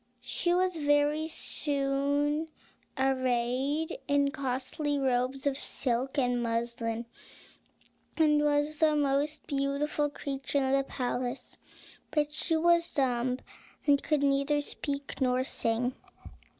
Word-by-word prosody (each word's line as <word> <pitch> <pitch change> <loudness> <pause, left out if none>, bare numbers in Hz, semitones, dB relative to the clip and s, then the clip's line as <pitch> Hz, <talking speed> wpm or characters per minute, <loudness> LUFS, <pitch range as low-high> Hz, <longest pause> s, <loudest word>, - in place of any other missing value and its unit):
She 345 - -1
was 365 0 +2
very 290 +1 +2
soon 285 0 0 0.5
arrayed 260 +3 0
in 285 -1 +2
costly 280 +1 -2
robes 260 0 0
of 280 -1 0
silk 260 +1 -1
and 245 -2 +2
muslin, 230 0 -2 1.1
and 300 -2 +4
was 295 +1 +1
the 310 -1 +4
most 290 +1 0
beautiful 280 +1 0
creature 275 -1 -3
in 265 -1 +2
the 275 0 +3
palace; 250 -1 -3 0.5
but 295 -1 0
she 325 +2 0
was 340 +1 +3
dumb, 250 -2 +1 0.5
and 285 -1 +4
could 300 -2 +1
neither 280 +1 +2
speak 285 -1 -4
nor 255 0 +2
sing. 245 0 0
280 Hz, 110 wpm, -30 LUFS, 255-295 Hz, 1.1 s, and